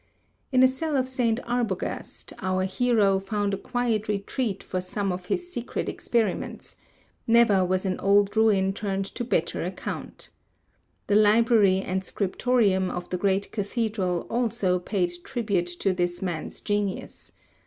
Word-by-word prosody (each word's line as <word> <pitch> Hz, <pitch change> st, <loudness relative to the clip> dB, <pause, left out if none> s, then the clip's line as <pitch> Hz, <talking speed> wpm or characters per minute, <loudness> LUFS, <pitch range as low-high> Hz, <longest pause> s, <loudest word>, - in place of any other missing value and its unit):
In 255 Hz, -1 st, +5 dB
a -, -, +9 dB
cell 285 Hz, +3 st, -1 dB
of 260 Hz, -1 st, +1 dB
St. 245 Hz, -3 st, 0 dB
Arbogast, 235 Hz, -6 st, -3 dB
our 185 Hz, -1 st, 0 dB
hero 200 Hz, -1 st, +2 dB
found 200 Hz, +1 st, -1 dB
a -, -, 0 dB
quiet 230 Hz, -1 st, -1 dB
retreat 210 Hz, +1 st, -2 dB
for 185 Hz, -, -3 dB
some 195 Hz, +2 st, -2 dB
of 180 Hz, 0 st, -5 dB
his 360 Hz, 0 st, -2 dB
secret 240 Hz, 0 st, -3 dB
experiments; 225 Hz, -5 st, -2 dB, 0.5 s
never 225 Hz, -5 st, +5 dB
was 185 Hz, +1 st, 0 dB
an 185 Hz, -1 st, -1 dB
old 200 Hz, +1 st, +3 dB
ruin 200 Hz, -3 st, +3 dB
turned 195 Hz, -1 st, -2 dB
to -, -, -3 dB
better 170 Hz, -10 st, 0 dB
account. 185 Hz, +2 st, -6 dB, 0.7 s
The -, -, 0 dB
Library 215 Hz, -2 st, +5 dB
and 190 Hz, +1 st, -2 dB
Scriptorium 200 Hz, -1 st, +1 dB
of 175 Hz, 0 st, -6 dB
the 180 Hz, -, 0 dB
great 195 Hz, +1 st, 0 dB
Cathedral 205 Hz, -4 st, -1 dB
also 230 Hz, -6 st, 0 dB
paid 180 Hz, -1 st, -1 dB
tribute 205 Hz, -8 st, -1 dB
to 195 Hz, -, +2 dB
this 175 Hz, -1 st, -1 dB
man's 175 Hz, -4 st, -4 dB
genius. 205 Hz, -2 st, -3 dB
200 Hz, 145 wpm, -26 LUFS, 185-230 Hz, 0.7 s, a